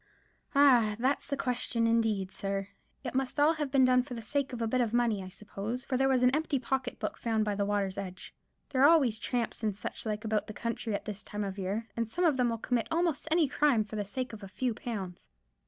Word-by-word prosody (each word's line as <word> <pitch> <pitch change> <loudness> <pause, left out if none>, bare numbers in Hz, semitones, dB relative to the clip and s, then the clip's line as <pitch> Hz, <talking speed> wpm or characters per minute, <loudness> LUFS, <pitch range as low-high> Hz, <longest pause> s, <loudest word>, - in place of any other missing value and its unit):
"Ah! 245 -7 +5
that's 260 +4 0
the 280 - -2
question, 245 -2 +1
indeed, 220 -4 +1
sir. 195 0 -3 0.3
It 245 - -4
must 265 +2 -1
all 300 +3 +5
have 300 -3 -3
been 265 -1 +5
done 255 0 +5
for 250 0 -7
the 230 - -6
sake 280 +5 -1
of 245 - -5
a 230 - 0
bit 255 +3 +1
of 230 -2 0
money, 235 -4 +2
I 185 - -8
suppose; 210 +5 -6
for 260 - -1
there 270 +1 +3
was 255 -2 +3
an 250 +2 +5
empty 305 -2 0
pocket 255 0 -2
book - - -4
found 220 -2 0
by 210 - 0
the 200 0 0
water's 200 -2 -1
edge. 185 -1 -7 0.4
There 260 -2 0
are 285 - +8
always 265 -10 +4
tramps 235 0 -2
and 215 -3 0
such 205 - -5
like 210 0 -3
about 215 -1 0
the 215 - -6
country 230 -1 -3
at - - -5
this 210 -1 -5
time 210 0 -5
of 195 0 -4
year; 200 +5 -2
and 230 -1 -1
some 355 +8 0
of 310 -4 +4
them 250 -1 +2
will 230 - -1
commit 235 0 -1
almost 330 -3 0
any 320 -1 +4
crime 280 -5 +3
for 210 +1 -9
the 210 - -1
sake 245 +4 -4
of 220 - -8
a 195 - -7
few 245 +5 -2
pounds. 200 -6 -6
235 Hz, 250 wpm, -30 LUFS, 210-265 Hz, 0.4 s, are